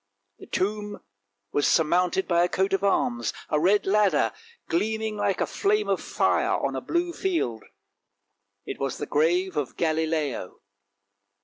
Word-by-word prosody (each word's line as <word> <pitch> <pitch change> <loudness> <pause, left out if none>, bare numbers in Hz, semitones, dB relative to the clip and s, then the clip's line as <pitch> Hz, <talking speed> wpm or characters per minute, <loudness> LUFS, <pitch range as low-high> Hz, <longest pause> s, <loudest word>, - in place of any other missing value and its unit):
The - - -12
tomb 205 +2 -2 0.5
was 145 - +2
surmounted 180 +3 +2
by 170 -1 +3
a 175 - +1
coat 190 +1 0
of 195 0 +1
arms, 120 - +1 0.2
a 150 - +2
red 195 +6 +3
ladder 205 0 +2 0.3
gleaming 220 +4 -1
like 205 - 0
a - - +2
flame 420 +1 0
of - - 0
fire - - +1
on - - -2
a - - -3
blue 345 0 -1
field. 330 - -1 1.0
It - - -6
was 135 -2 -2
the 145 - -4
grave 175 +6 +1
of 145 -4 -3
Galileo. 155 - -1
180 Hz, 145 wpm, -26 LUFS, 155-210 Hz, 1.0 s, by